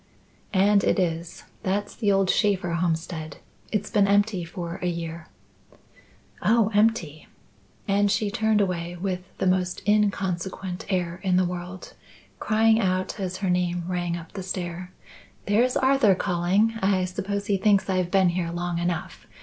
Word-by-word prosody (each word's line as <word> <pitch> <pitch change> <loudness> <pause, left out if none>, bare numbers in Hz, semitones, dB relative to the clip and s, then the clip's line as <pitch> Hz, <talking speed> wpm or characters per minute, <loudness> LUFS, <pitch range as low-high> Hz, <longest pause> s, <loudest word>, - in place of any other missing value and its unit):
"And 200 +1 +4
it - - +2
is. 170 -2 -2 0.2
That's 205 +2 -2
the 210 -4 +1
old 195 -1 +3
Shaffer 195 -5 +1
homestead. 165 -2 -2 0.3
It's 210 -1 -2
been 205 -2 +3
empty 200 -2 +2
for 170 +1 -6
a 180 - -1
year." 170 -1 -4 1.1
"Oh, 220 -1 +3
empty!" 205 -8 +1 0.6
And 200 0 +2
she 205 0 0
turned 220 0 +2
away, 175 -2 -2
with 185 -1 -2 0.2
the - - -1
most 185 -1 0
inconsequent 190 -3 -1
air 175 -2 -1
in 185 -2 +1
the 185 0 +3
world, 180 +1 -6 0.5
crying 220 +1 +3
out 185 -1 -1
as 185 -1 -3
her - - +1
name 175 -1 0
rang 175 -1 -2
up 165 -1 -10
the 195 - -6
stair, 180 -1 -5 0.5
"There's 235 +5 +2
Arthur 260 -7 +4
calling. 190 +6 +1
I 190 -1 +2
suppose 200 +2 -3
he 200 -2 +1
thinks 200 0 +3
I've 185 -2 0
been 190 -1 +4
here 170 -1 -2
long 175 0 -3
enough. 175 -1 -3
185 Hz, 150 wpm, -25 LUFS, 175-205 Hz, 1.1 s, And